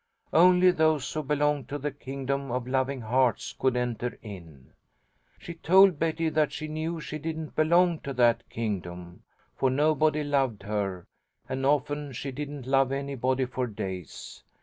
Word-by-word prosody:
Only 180 +2 +6
those 155 -4 +1
who 155 - -1
belong 150 -1 0
to 145 - -5
the 145 +1 -3
kingdom 140 0 -4
of 125 0 -2
loving 130 +1 -1
hearts 125 +2 +1
could 130 -2 0
enter 125 0 -2
in.' 85 - -11 0.6
She 170 - -8
told 185 0 +5
Betty 165 0 0
that 155 -2 +1
she 155 +1 -5
knew 160 +2 -3
she 155 -1 -6
didn't 160 0 -5
belong 170 +1 +3
to 140 - -6
that 120 -2 +3
kingdom, 90 -6 -5 0.3
for 130 - +1
nobody 150 +2 +2
loved 135 -8 0
her, 100 -3 -3 0.4
and 135 +1 -1
often 145 0 0
she 135 +3 -5
didn't 145 -1 -6
love 135 0 +2
anybody 135 -1 -1
for 125 0 -3
days. 95 - -7
140 Hz, 150 wpm, -27 LUFS, 125-155 Hz, 0.6 s, Only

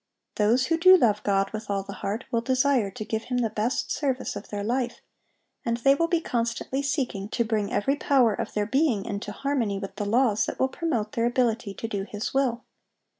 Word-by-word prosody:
Those 230 +5 +3
who 330 +4 +1
do 370 +2 +8
love 215 - +2
God 195 -1 +1
with 215 -1 -6
all 200 -1 -1
the 200 - -8
heart 215 +6 -2
will 230 -2 +1
desire 260 -3 +2
to 210 +2 -7
give 220 0 -3
Him 250 0 -2
the 230 -3 0
best 220 +4 -1
service 265 -7 -1
of 205 - -8
their 205 -1 -4
life, 240 +2 -1 0.6
and 235 -3 0
they 275 +3 +4
will 335 +4 +1
be 340 0 +2
constantly 235 0 -2
seeking 260 -8 -2
to 235 - 0
bring 215 -2 -1
every 270 +8 +1
power 260 -7 +3
of - - -5
their 210 -1 +1
being 250 -4 +1
into 205 -2 -4
harmony 240 -5 -1
with 195 0 -7
the 205 - -2
laws 230 -2 +2
that - - -5
will 260 - +2
promote 250 -10 -2
their 230 0 +1
ability 230 -4 0
to 225 - -4
do 205 -3 -3
His 210 +1 -5
will. 255 -3 +1
230 Hz, 215 wpm, -26 LUFS, 210-265 Hz, 0.6 s, do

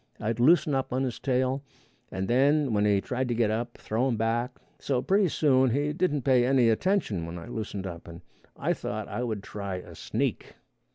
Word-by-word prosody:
I'd 115 +2 -2
loosen 150 +3 +4
up 135 -1 -1
on 130 +2 0
his 125 -3 -3
tail, 130 +1 0 0.5
and 95 0 -3
then 140 +2 +3
when 105 0 +2
he 100 -2 +3
tried 130 +3 -2
to 120 - -1
get 115 -2 +2
up, 120 +2 -3
throw 115 +5 -1
him 120 -4 0
back; 120 +3 -1 0.2
so 135 -3 0
pretty 195 +8 +2
soon 130 -4 +3
he 145 +5 0
didn't 150 -5 0
pay 130 -3 +4
any 125 -2 +4
attention 115 - +1
when 85 +1 -6
I 85 - -8
loosened 110 -4 -5
up, 85 -2 -7
and 85 +1 -10 0.4
I - - 0
thought - - -5
I - - -4
would 110 -5 -3
try 100 -3 -5
a 90 - -8
sneak. - - -3
125 Hz, 205 wpm, -27 LUFS, 110-135 Hz, 0.5 s, loosen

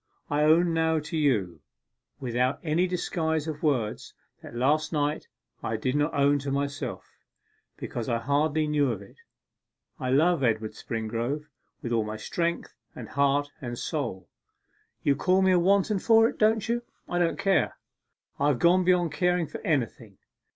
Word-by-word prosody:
I 145 +1 +2
own 165 +3 +4
now 160 0 +2
to 150 +1 -4
you, 105 - 0 0.6
without 125 +1 0
any 170 +3 +1
disguise 160 -3 -1
of 155 -1 -5
words, 130 -10 -1 0.2
what - - -11
last 145 +6 +1
night 150 -1 -1 0.3
I 110 - -2
did 130 +4 -1
not 145 0 +1
own 145 0 +3
to 140 0 -5
myself, 140 +1 -3 0.7
because 120 -1 -5
I 120 - +1
hardly 145 +5 +1
knew 145 -3 +1
of 100 -3 -5
it. 100 - -18 0.8
I 130 - -2
love 155 +3 +3
Edward 110 -2 +1
Springrove 115 +6 -3 0.4
with 120 - -4
all 115 -2 +2
my 105 0 -5
strength, 170 +9 -2 0.2
and - - -8
heart, 140 +1 +1
and 120 -2 -5
soul. 115 - -4 0.8
You 140 - +3
call 185 +6 +2
me 190 - +4
a 180 - +4
wanton 200 +3 +2
for 225 +2 +5
it, - - -6
don't 220 0 +3
you? 235 +1 0 0.3
I 175 - -1
don't 170 -1 +1
care; 195 -1 +1 0.6
I 140 - +2
have 145 -4 +2
gone 175 +6 +4
beyond 175 -2 +2
caring 180 -2 +1
for - - -8
anything! 115 - -2
145 Hz, 165 wpm, -27 LUFS, 125-170 Hz, 0.8 s, for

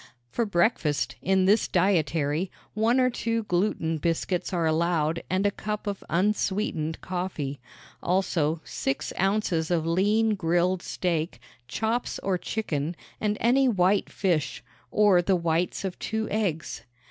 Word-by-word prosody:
For 235 - 0
breakfast, 170 -6 +1
in 190 0 +2
this 205 +3 +4
dietary, 170 -2 +1 0.2
one 225 +4 +2
or 255 0 +3
two 230 -1 -1
gluten 175 -4 0
biscuits 170 +4 -1
are 170 -3 0
allowed 160 0 +1
and 185 +2 +1
a 205 - +3
cup 210 +1 -4
of 200 -2 -4
unsweetened 185 -3 0
coffee. 175 -7 -3 0.4
Also, 170 -4 +1
six 135 - -3
ounces 190 -4 +1
of 170 -3 +1
lean 210 +6 +2
grilled 175 0 +1
steak, 165 -9 -2 0.3
chops 225 +2 -1
or 190 -2 0
chicken, 170 -6 -2 0.2
and 210 -1 0
any 260 +4 +4
white 195 -3 +2
fish 155 -10 -1 0.3
or 205 -1 +5
the 185 +2 +2
whites 170 +2 0
of 185 -2 -4
two 220 0 -2
eggs. 175 - -1
180 Hz, 135 wpm, -26 LUFS, 165-210 Hz, 0.4 s, or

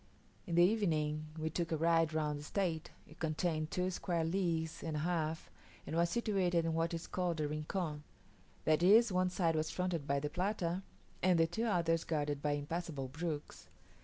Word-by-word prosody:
In 170 - -1
the 175 - +7
evening 155 -7 +1
we 160 0 -2
took 170 +1 -2
a 160 - +1
ride 165 0 +3
round 150 -2 -1
the - - -8
estate: 165 0 -2 0.2
it 155 - -16
contained 155 0 -1
two 180 +2 0
square 175 -2 -1
leagues 165 -2 -1
and 160 -2 -3
a - - 0
half, 160 -1 -1 0.3
and - - -4
was 170 0 +3
situated 185 -5 +1
in 165 - 0
what 165 +1 0
is 165 - -5
called 175 -3 -1
a 150 - +1
rincon; 150 +1 -3 0.6
that 155 +1 +3
is, 215 +5 +6
one 185 0 +2
side 175 -2 +1
was 155 0 0
fronted 180 -5 -2
by 140 0 +2
the 150 - -2
Plata, 180 +1 -1 0.4
and 185 -1 +4
the 165 - +5
two 195 +8 -2
others 165 -6 +2
guarded 145 -3 -1
by 150 0 +1
impassable 145 -2 -3
brooks. 155 +1 -5
165 Hz, 190 wpm, -35 LUFS, 155-180 Hz, 0.6 s, the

